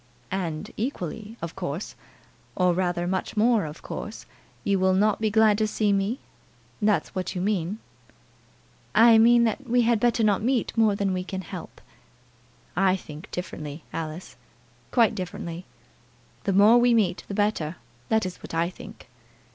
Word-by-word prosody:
"And 170 Hz, -5 st, -3 dB
equally, 220 Hz, -, -4 dB
of 170 Hz, -, -5 dB
course! 175 Hz, -1 st, -4 dB, 0.6 s
or, 180 Hz, -1 st, +3 dB
rather, 175 Hz, -1 st, 0 dB
much 190 Hz, +4 st, -2 dB
more 225 Hz, -3 st, +3 dB
of 150 Hz, +1 st, -9 dB
course, 215 Hz, -, -7 dB, 0.4 s
you 200 Hz, -1 st, +1 dB
will 185 Hz, 0 st, +3 dB
not 210 Hz, +2 st, +2 dB
be 220 Hz, -, +2 dB
glad 215 Hz, -1 st, +4 dB
to 215 Hz, -, +2 dB
see 210 Hz, -1 st, +1 dB
me? 200 Hz, +6 st, 0 dB, 0.6 s
That's 210 Hz, -1 st, +1 dB
what 185 Hz, +1 st, -3 dB
you -, -, -2 dB
mean?" 195 Hz, 0 st, -1 dB, 1.2 s
"I 225 Hz, 0 st, +7 dB
mean 235 Hz, +1 st, +6 dB
that 235 Hz, +3 st, -1 dB
we 245 Hz, 0 st, +4 dB
had 230 Hz, -1 st, +3 dB
better 235 Hz, 0 st, +2 dB
not 205 Hz, -2 st, +3 dB
meet 245 Hz, +1 st, 0 dB
more 220 Hz, -3 st, +3 dB
than 200 Hz, -1 st, 0 dB
we 185 Hz, 0 st, -2 dB
can 190 Hz, 0 st, -5 dB
help." 175 Hz, -, -9 dB, 1.0 s
"I 190 Hz, +1 st, +3 dB
think 155 Hz, -4 st, -10 dB
differently, 155 Hz, -4 st, -6 dB
Alice, 165 Hz, +2 st, -6 dB, 0.5 s
quite 230 Hz, -2 st, +4 dB
differently. 180 Hz, -2 st, -6 dB, 0.8 s
The 195 Hz, -, +1 dB
more 210 Hz, +5 st, +7 dB
we 240 Hz, 0 st, +4 dB
meet 190 Hz, -6 st, +1 dB
the 200 Hz, -, -5 dB
better, 200 Hz, -6 st, 0 dB, 0.3 s
that 220 Hz, -2 st, +2 dB
is 185 Hz, -1 st, -5 dB
what -, -, -8 dB
I 170 Hz, +2 st, +1 dB
think. 180 Hz, -, -12 dB
200 Hz, 160 wpm, -25 LUFS, 180-220 Hz, 1.2 s, I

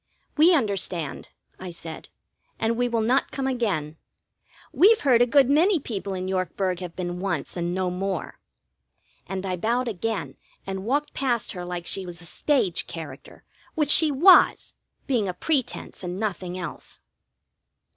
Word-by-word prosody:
"We 335 Hz, +4 st, +6 dB
understand," 195 Hz, -, -2 dB, 0.3 s
I 185 Hz, -, -7 dB
said. 165 Hz, -2 st, -8 dB, 0.5 s
"And 225 Hz, +1 st, 0 dB
we 245 Hz, +1 st, 0 dB
will 230 Hz, -1 st, 0 dB
not 255 Hz, +5 st, +2 dB
come 270 Hz, -, -3 dB
again. 200 Hz, -, -1 dB, 0.8 s
We've 435 Hz, +4 st, +5 dB
heard 250 Hz, -4 st, +4 dB
a 245 Hz, -, +5 dB
good 270 Hz, +1 st, +5 dB
many 330 Hz, +6 st, +4 dB
people 200 Hz, -7 st, -5 dB
in 185 Hz, 0 st, -4 dB
Yorkburg 185 Hz, -1 st, -1 dB
have 180 Hz, -2 st, -7 dB
been 175 Hz, -1 st, -4 dB
once 185 Hz, -4 st, -3 dB
and 175 Hz, 0 st, -2 dB
no 185 Hz, -1 st, -1 dB
more." 190 Hz, 0 st, -4 dB, 0.9 s
And 190 Hz, +1 st, -4 dB
I 185 Hz, -1 st, -2 dB
bowed 240 Hz, +7 st, 0 dB
again 195 Hz, -, -3 dB, 0.3 s
and 190 Hz, 0 st, -5 dB
walked 290 Hz, +5 st, 0 dB
past 245 Hz, -5 st, -1 dB
her 180 Hz, -2 st, -6 dB
like 175 Hz, -1 st, -5 dB
she 190 Hz, 0 st, -2 dB
was 175 Hz, -1 st, -8 dB
a 175 Hz, -, -9 dB
stage 200 Hz, -, 0 dB
character, 165 Hz, -2 st, -9 dB, 0.3 s
which 300 Hz, -3 st, +2 dB
she 315 Hz, 0 st, +7 dB
was, 345 Hz, +7 st, +5 dB, 0.3 s
being 235 Hz, -7 st, 0 dB
a 180 Hz, -, -3 dB
pretence 260 Hz, -, -2 dB
and 180 Hz, +1 st, -4 dB
nothing 185 Hz, -4 st, -3 dB
else. 180 Hz, -2 st, -8 dB
195 Hz, 155 wpm, -25 LUFS, 180-255 Hz, 0.9 s, she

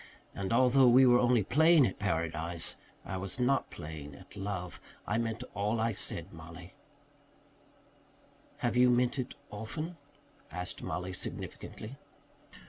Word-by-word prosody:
And 95 Hz, -1 st, -3 dB
although 130 Hz, +2 st, +5 dB
we 130 Hz, +2 st, +7 dB
were 120 Hz, -1 st, +6 dB
only 120 Hz, -3 st, +4 dB
playing 160 Hz, -, +5 dB
at 95 Hz, -, -3 dB
paradise, 85 Hz, -3 st, -1 dB, 0.3 s
I 95 Hz, -, -4 dB
was 95 Hz, +5 st, -3 dB
not 130 Hz, +2 st, +2 dB
playing 75 Hz, -3 st, -8 dB
at 70 Hz, -, -14 dB
love. 95 Hz, -3 st, -4 dB, 0.2 s
I 110 Hz, +3 st, 0 dB
meant 115 Hz, +1 st, -2 dB
all 105 Hz, +3 st, 0 dB
I 115 Hz, +1 st, +2 dB
said, 90 Hz, -3 st, -4 dB
Mollie." 85 Hz, +2 st, -11 dB, 1.9 s
"Have 120 Hz, -, +1 dB
you 125 Hz, 0 st, +6 dB
meant 125 Hz, +2 st, +2 dB
it 125 Hz, -, -4 dB, 0.2 s
often?" 155 Hz, +11 st, -5 dB, 0.5 s
asked 90 Hz, +2 st, -4 dB
Mollie 90 Hz, +1 st, -3 dB
significantly. 110 Hz, +7 st, -5 dB
105 Hz, 130 wpm, -32 LUFS, 90-125 Hz, 1.9 s, we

